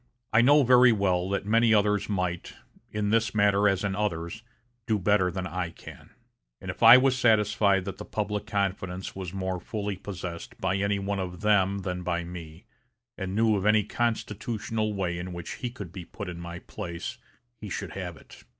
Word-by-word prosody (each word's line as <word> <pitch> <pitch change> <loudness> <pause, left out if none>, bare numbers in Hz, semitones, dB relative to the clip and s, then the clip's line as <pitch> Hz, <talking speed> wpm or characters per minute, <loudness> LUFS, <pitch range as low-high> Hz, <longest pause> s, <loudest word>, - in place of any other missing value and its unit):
I 110 - +6
know 145 +4 +6
very 125 0 +7
well 95 -4 +1
that 100 0 -1
many 115 +1 +4
others 105 0 +2
might, 90 -3 -2 0.4
in 105 -1 -1
this 115 -1 +1
matter 100 0 +4
as 95 0 0
in 100 -1 -1
others, 90 -1 -2 0.5
do 110 - +2
better 100 -1 +2
than 90 +1 -4
I 90 0 -3
can; 85 - -13 0.5
and - - -5
if - - -14
I 115 +2 +10
was 130 0 +3
satisfied 105 -5 +3
that 95 -1 -6
the 105 - -6
public 105 -1 -3
confidence 95 -2 -2
was 95 -3 -5
more 95 -1 -3
fully 105 +1 -4
possessed 90 -3 -7
by 95 +1 0
any 100 +1 +1
one 100 0 -2
of 90 -1 -5
them 100 -2 +2
than 90 -1 -3
by 85 -1 -1
me, 85 +2 -9 0.5
and 95 -1 -4
knew 110 0 +3
of 95 - -1
any 105 0 +5
constitutional 110 0 -2
way 90 -4 -2
in 90 +1 -6
which 85 -1 -6
he 125 - -2
could 100 -8 -9
be 95 -3 -7
put 100 0 -7
in 85 -1 -7
my 85 0 -7
place, 85 0 -7 0.4
he 105 - -7
should - - -4
have - - -6
it. - - -16
100 Hz, 190 wpm, -27 LUFS, 90-105 Hz, 0.5 s, I